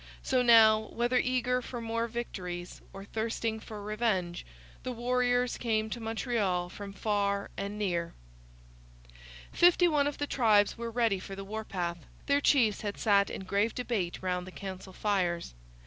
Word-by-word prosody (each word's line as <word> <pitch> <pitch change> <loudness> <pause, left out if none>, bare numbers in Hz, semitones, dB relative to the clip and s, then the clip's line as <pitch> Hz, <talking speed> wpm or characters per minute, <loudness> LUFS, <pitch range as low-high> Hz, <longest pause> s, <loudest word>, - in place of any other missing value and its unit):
So 255 -1 +2
now, 225 -3 +7
whether 240 +2 +2
eager 250 0 +1
for 245 0 -6
more 230 0 -2
victories 180 -7 -6
or 195 0 -9
thirsting 225 +1 -2
for 215 -1 -9
revenge, 210 -5 -1 0.3
the 255 - -4
warriors 245 +1 +1
came 220 -2 0
to 240 - -3
Montreal 220 -6 -1
from 200 +2 -8
far 200 -1 -1
and 200 +1 -4
near. 175 -5 -2 1.4
Fifty 355 0 +5
one 295 -3 +2
of 290 - -3
the 290 - -1
tribes 215 -7 +3
were 235 0 -5
ready 230 -4 +1
for 195 +1 -8
the 195 0 -7
warpath. 190 -5 -4 0.3
Their 285 0 +2
chiefs 235 -8 +3
had 205 -1 -4
sat 200 -2 +3
in - - -6
grave 200 +4 0
debate 210 -9 -2
round 180 -1 -2
the - - -8
council 190 0 -7
fires. 180 - -1
220 Hz, 155 wpm, -30 LUFS, 195-240 Hz, 1.4 s, now